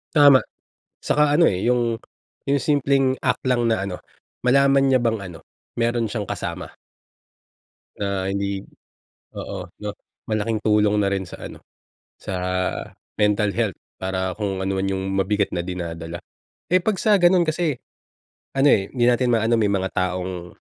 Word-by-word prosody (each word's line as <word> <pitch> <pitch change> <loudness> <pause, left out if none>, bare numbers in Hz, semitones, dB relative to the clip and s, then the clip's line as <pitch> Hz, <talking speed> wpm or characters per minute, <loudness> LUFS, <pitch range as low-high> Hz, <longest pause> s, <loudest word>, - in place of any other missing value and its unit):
Tama, 145 -3 +7 0.6
'saka 150 0 +2
ano, 170 - +5
eh, 95 0 -2
yung 120 -1 +1 0.5
yung 140 -1 +1
simpleng 135 -2 +2
act 125 -1 +1
lang 120 -1 +2
na 110 -4 +1
ano, 90 -2 -5 0.5
malaman 135 +1 +4
niya 130 -2 +4
bang 115 -2 +1
ano, 85 -3 -9 0.4
mayro'n 120 0 +1
siyang 100 -2 -4
kasama. - - -4 1.3
Na 100 -2 -1
hindi 100 0 -2 0.7
oo, 95 -2 -6
'no? 105 - -3 0.4
Malaking 110 +1 0
tulong 105 -1 +3
na 100 - +2
rin 95 -1 -1
sa - - -9
ano, - - -12 0.6
sa - - -6 0.8
mental 105 0 +2
health 110 -6 -1 0.2
para 95 0 -2
kung 100 -3 -2
ano 95 0 -1
man 95 - -1
yung 95 0 -2
mabigat 100 +1 +1
na 85 - -1
dinadala. 85 -2 -5 0.5
Eh, 185 +2 +4
'pag 210 0 0
sa 215 -1 +4
gano'n 175 0 +5
kasi 155 -4 0 0.8
ano 135 +1 +4
eh, 95 -1 +3
hindi 120 -2 +1
natin 125 0 +2
maano 115 +1 +2
may 105 -2 +2
mga 95 -1 0
taong 90 -1 -3
105 Hz, 150 wpm, -22 LUFS, 95-130 Hz, 1.3 s, Tama